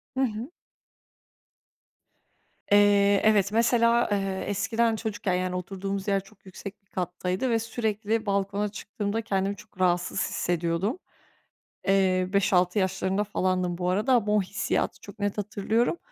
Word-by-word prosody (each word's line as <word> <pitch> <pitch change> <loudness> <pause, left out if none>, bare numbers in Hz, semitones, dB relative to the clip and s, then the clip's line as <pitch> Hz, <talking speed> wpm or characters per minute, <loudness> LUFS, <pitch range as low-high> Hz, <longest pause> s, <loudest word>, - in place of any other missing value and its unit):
Hı - - -2
hı. 230 +3 -3 2.2
Eee. 205 -1 +5
Evet, 205 -2 +4
mesela, 235 +1 +3
eee, 195 -2 -1
eskiden 225 +3 +1
çocukken, 215 -3 -2
yani 180 0 -1
oturduğumuz 195 +2 -4
yer 195 -1 +1
çok 200 0 -21
yüksek 195 +2 -9
bir - - -40
kattaydı 180 +6 -2
ve 230 - +2
sürekli 225 -1 -2
balkona 200 +1 0
çıktığımda 210 +1 -3
kendimi 195 -1 -1
çok 210 -1 -17
rahatsız 175 -1 +1
hissediyordum. 175 - -1 0.9
Eee, 190 -2 +3
5-6. 185 -1 +3
yaşlarında 190 +1 0
falandım 185 -3 -1
bu 180 0 -1
arada 210 +8 +2
ama 210 -4 +2
o 210 - +4
hissiyatı 195 +3 -2
çok 205 +1 -12
net 205 0 -1
hatırlıyorum. 215 - 0
200 Hz, 130 wpm, -27 LUFS, 185-215 Hz, 2.2 s, Eee